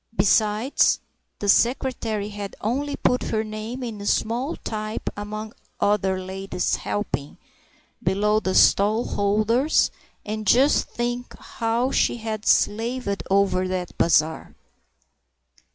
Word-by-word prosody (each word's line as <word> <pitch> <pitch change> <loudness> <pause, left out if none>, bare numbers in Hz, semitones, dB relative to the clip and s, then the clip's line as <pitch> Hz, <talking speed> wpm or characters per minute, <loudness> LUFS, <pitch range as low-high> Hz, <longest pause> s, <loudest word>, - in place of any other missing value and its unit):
Besides, 215 +5 +3 0.4
the 205 - -4
secretary 230 -2 +1
had 205 -1 -7
only 280 +6 -1
put 250 - +1
her 220 0 -1
name 215 +4 -6
in 215 -4 -6
small 245 +7 0
type 215 0 -4
among 215 +1 -6 0.3
"other 195 -2 +1
ladies 190 0 -2
helping" 150 -8 -4 0.6
below 210 +3 +2
the 190 -3 -2
stallholders, 215 +5 +3 0.3
and 215 0 -4
just 265 +8 +4
think 240 +1 -4
how 235 +2 -1
she - - +1
had 220 -2 -5
slaved 225 -1 +1
over 190 -1 +2
that 185 -1 -4
bazaar!). 160 -1 +2
215 Hz, 105 wpm, -24 LUFS, 200-235 Hz, 0.6 s, just